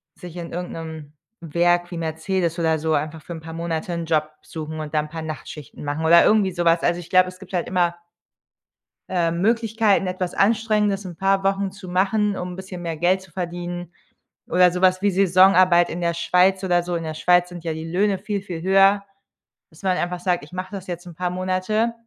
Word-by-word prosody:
sich 175 Hz, -2 st, -11 dB
in 170 Hz, -1 st, -6 dB
irgendeinem 160 Hz, -3 st, -7 dB, 0.3 s
Werk 175 Hz, +2 st, +1 dB
wie 175 Hz, -, -5 dB
Mercedes 165 Hz, +2 st, -2 dB
oder 160 Hz, -2 st, +1 dB
so 160 Hz, 0 st, 0 dB
einfach 155 Hz, +2 st, -2 dB
für 170 Hz, -, -8 dB
‘n 165 Hz, -, -7 dB
paar 165 Hz, +1 st, -9 dB
Monate 170 Hz, +2 st, -3 dB
‘n 170 Hz, -1 st, -3 dB
Job 155 Hz, -1 st, 0 dB
suchen 155 Hz, -1 st, -7 dB
und 155 Hz, 0 st, -6 dB
dann 150 Hz, 0 st, +1 dB
‘n 150 Hz, -, -14 dB
paar 165 Hz, 0 st, -5 dB
Nachtschichten 155 Hz, -3 st, -8 dB
machen 145 Hz, +2 st, -3 dB
oder 170 Hz, +1 st, +7 dB
irgendwie 205 Hz, -3 st, +3 dB
sowas. 170 Hz, -1 st, +2 dB
Also, 175 Hz, 0 st, +1 dB
ich 175 Hz, -, -10 dB
glaube, 185 Hz, 0 st, +5 dB
es 185 Hz, -, -13 dB
gibt 195 Hz, -1 st, -14 dB
halt 175 Hz, -, -1 dB
immer 175 Hz, -2 st, +1 dB, 1.1 s
ähm, 170 Hz, -2 st, 0 dB
Möglichkeiten, 220 Hz, -2 st, +2 dB
etwas 185 Hz, -1 st, -3 dB
Anstrengendes 210 Hz, -2 st, +1 dB
‘n 175 Hz, -2 st, -8 dB
paar 195 Hz, +1 st, +1 dB
Wochen 195 Hz, 0 st, 0 dB
zu 195 Hz, -1 st, -11 dB
machen, 200 Hz, +3 st, +1 dB
um 180 Hz, -, -4 dB
‘n 180 Hz, -, -8 dB
bisschen 190 Hz, -2 st, -8 dB
mehr 165 Hz, -2 st, -3 dB
Geld 185 Hz, +3 st, +2 dB
zu 190 Hz, -, -17 dB
verdienen 175 Hz, 0 st, -5 dB, 0.6 s
oder 180 Hz, 0 st, +5 dB
sowas 185 Hz, +1 st, +2 dB
wie 205 Hz, -, +3 dB
Saisonarbeit 185 Hz, -1 st, +5 dB
in 170 Hz, -, -4 dB
der 170 Hz, -, +1 dB
Schweiz 185 Hz, +3 st, +2 dB
oder 175 Hz, -1 st, +2 dB
so. 175 Hz, 0 st, -4 dB
In 165 Hz, -, -4 dB
der 155 Hz, 0 st, -4 dB
Schweiz 175 Hz, +2 st, +3 dB
sind 175 Hz, -1 st, -9 dB
ja 165 Hz, -, -1 dB
die 160 Hz, +1 st, -6 dB
Löhne 195 Hz, +2 st, +1 dB
viel, 205 Hz, 0 st, -3 dB
viel 175 Hz, -4 st, -6 dB
höher, 195 Hz, +2 st, +4 dB, 0.7 s
dass 155 Hz, -, -18 dB
man 185 Hz, -1 st, +1 dB
einfach 180 Hz, 0 st, -2 dB
sagt: 175 Hz, -4 st, 0 dB
„Ich 150 Hz, -, -19 dB
mache 185 Hz, +1 st, -5 dB
das 190 Hz, -1 st, -7 dB
jetzt 175 Hz, 0 st, -6 dB
‘n 170 Hz, -, -10 dB
paar 180 Hz, 0 st, -2 dB
Monate, 185 Hz, +5 st, 0 dB
180 Hz, 210 wpm, -22 LUFS, 165-190 Hz, 1.1 s, oder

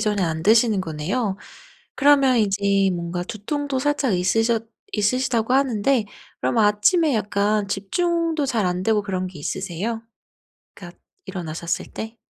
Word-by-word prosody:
전에 210 Hz, -2 st, 0 dB
안 160 Hz, -2 st, -1 dB
드시는 220 Hz, 0 st, +4 dB
거네요. 185 Hz, +6 st, -2 dB, 0.6 s
그러면 275 Hz, -3 st, +4 dB
이제 200 Hz, -2 st, +2 dB
뭔가 170 Hz, +1 st, -3 dB
두통도 275 Hz, +7 st, -3 dB
살짝 290 Hz, -4 st, 0 dB
있으셨 225 Hz, +5 st, +1 dB, 0.3 s
있으시다고 240 Hz, +2 st, 0 dB
하는데 260 Hz, -2 st, +2 dB, 0.4 s
그럼 235 Hz, -, 0 dB
아침에 220 Hz, -, +3 dB
약간 205 Hz, 0 st, 0 dB
집중도 325 Hz, -, 0 dB
잘 225 Hz, -6 st, 0 dB
안되고 190 Hz, +4 st, +1 dB
그런 185 Hz, -2 st, -3 dB
게 180 Hz, -4 st, -10 dB
있으세요? 190 Hz, +8 st, -4 dB, 0.7 s
그러니까 -, -, -12 dB, 0.3 s
일어나셨을 170 Hz, -2 st, -4 dB
때? 220 Hz, +1 st, -7 dB
210 Hz, 305 characters per minute, -22 LUFS, 190-255 Hz, 0.7 s, 드시는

